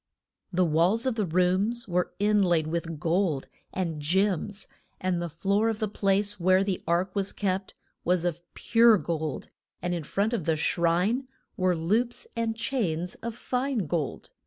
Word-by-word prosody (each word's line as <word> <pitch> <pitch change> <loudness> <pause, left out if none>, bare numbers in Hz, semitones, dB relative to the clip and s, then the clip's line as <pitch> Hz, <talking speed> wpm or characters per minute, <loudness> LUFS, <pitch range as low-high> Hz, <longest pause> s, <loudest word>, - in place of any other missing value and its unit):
The 180 0 +2
walls 175 +9 +3
of 260 - +2
the 215 -4 -1
rooms 185 +7 +1
were 180 -1 0
in 210 +1 +3
laid 175 -4 +3
with 165 0 -3
gold, 165 -3 0 0.2
and 165 -5 -3
gems, 195 +5 0 0.3
and 185 -2 0
the 170 - -3
floor 200 +7 +1
of 225 - -1
the 215 -1 -1
place 200 0 +1
where 185 +2 +4
the 195 -2 -2
ark 180 +3 +1
was 200 -1 0
kept 190 -1 -2 0.3
was 180 0 +1
of 175 -1 -1
pure 230 -1 +5
gold, 160 -5 -3 0.3
and 175 0 -2
in 170 -2 -2
front 205 - 0
of 200 -10 -1
the 160 - +2
shrine 175 - +1 0.3
were 185 -1 +2
loops 220 +9 0
and 230 -1 -1
chains 180 -8 -1
of 235 -1 -4
fine 250 -3 -1
gold. 155 -2 -3
185 Hz, 165 wpm, -27 LUFS, 170-210 Hz, 0.3 s, pure